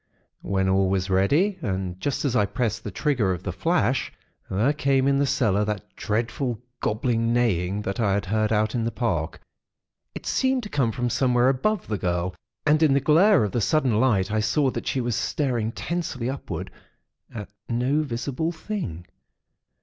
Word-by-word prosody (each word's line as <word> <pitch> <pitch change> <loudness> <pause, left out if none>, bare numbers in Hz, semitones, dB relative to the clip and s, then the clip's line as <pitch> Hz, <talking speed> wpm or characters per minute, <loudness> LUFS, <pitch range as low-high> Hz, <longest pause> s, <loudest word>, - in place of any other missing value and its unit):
When 95 0 0
all 95 0 +3
was 95 0 0
ready, 145 - +2
and 95 -2 -3
just 140 +8 -2
as 130 -3 0
I 105 -4 +3
pressed 115 -1 -2
the - - -4
trigger 125 -11 0
of 90 0 -6
the 95 - -2
'flash', 135 - 0 0.4
there 110 +10 +2
came 135 -2 +2
in 140 0 +3
the 140 - +2
cellar 105 -5 +2
that 105 -3 -5
dreadful, 120 +2 -2 0.2
gobbling 115 +1 0
neighing, 105 -5 +1
that 100 0 -3
I 100 -4 +2
had 100 -2 -1
heard 110 +3 0
out 110 0 +1
in 120 - 0
the 115 - -1
Park. 85 -11 -2 0.7
It - - -7
seemed 260 -1 +1
to 210 - -6
come 135 - +1
from 120 0 -2
somewhere 125 0 +3
above 180 +10 0
the 105 -2 -2
girl; 90 0 -1 0.3
and 155 +1 +4
in 150 -4 +5
the - - +4
glare 165 - +5
of 105 - -1
the 120 - 0
sudden 130 -3 +2
light, 105 -6 +2
I 110 - +1
saw 130 +6 +2
that - - -5
she 130 - 0
was 120 -2 -1
staring 120 -6 -1
tensely 130 -6 -3
upward 140 - -6 0.6
at 105 -4 -7 0.2
no 125 +6 +1
visible 140 +4 -2
thing. 160 - -5
120 Hz, 180 wpm, -25 LUFS, 100-140 Hz, 0.7 s, in